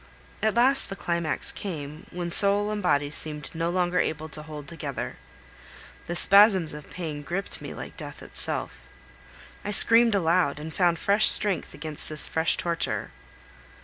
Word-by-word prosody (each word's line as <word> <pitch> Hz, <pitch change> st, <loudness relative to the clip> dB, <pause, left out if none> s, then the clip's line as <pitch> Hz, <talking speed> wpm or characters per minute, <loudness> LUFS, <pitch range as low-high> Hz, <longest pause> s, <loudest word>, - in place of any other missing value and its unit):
At 220 Hz, 0 st, 0 dB
last 260 Hz, +4 st, +4 dB
the 195 Hz, -, -5 dB
climax 170 Hz, -4 st, -1 dB
came, 155 Hz, -5 st, -7 dB
when 175 Hz, -1 st, -5 dB
soul 205 Hz, +3 st, +5 dB
and 210 Hz, -1 st, -3 dB
body 145 Hz, -5 st, 0 dB
seemed 150 Hz, 0 st, -4 dB
no 165 Hz, +1 st, -2 dB
longer 180 Hz, 0 st, 0 dB
able 155 Hz, 0 st, -2 dB
to 155 Hz, -, -6 dB
hold 150 Hz, -2 st, -10 dB
together; 140 Hz, -, -6 dB, 0.9 s
the 175 Hz, -, -4 dB
spasms 195 Hz, -4 st, +6 dB
of 150 Hz, 0 st, -11 dB
pain 155 Hz, -5 st, -6 dB
gripped 180 Hz, +7 st, -5 dB
me -, -, -8 dB
like -, -, -9 dB
death -, -, -9 dB
itself. -, -, -4 dB, 0.8 s
I -, -, -5 dB
screamed 230 Hz, +2 st, +4 dB
aloud, 170 Hz, -5 st, +1 dB
and 155 Hz, +1 st, -8 dB
found 175 Hz, -1 st, +1 dB
fresh 205 Hz, +5 st, +4 dB
strength 205 Hz, -4 st, +1 dB
against 155 Hz, 0 st, -5 dB
this 155 Hz, -1 st, -1 dB
fresh 160 Hz, 0 st, 0 dB
torture. 170 Hz, -1 st, -2 dB
170 Hz, 155 wpm, -25 LUFS, 155-200 Hz, 0.9 s, spasms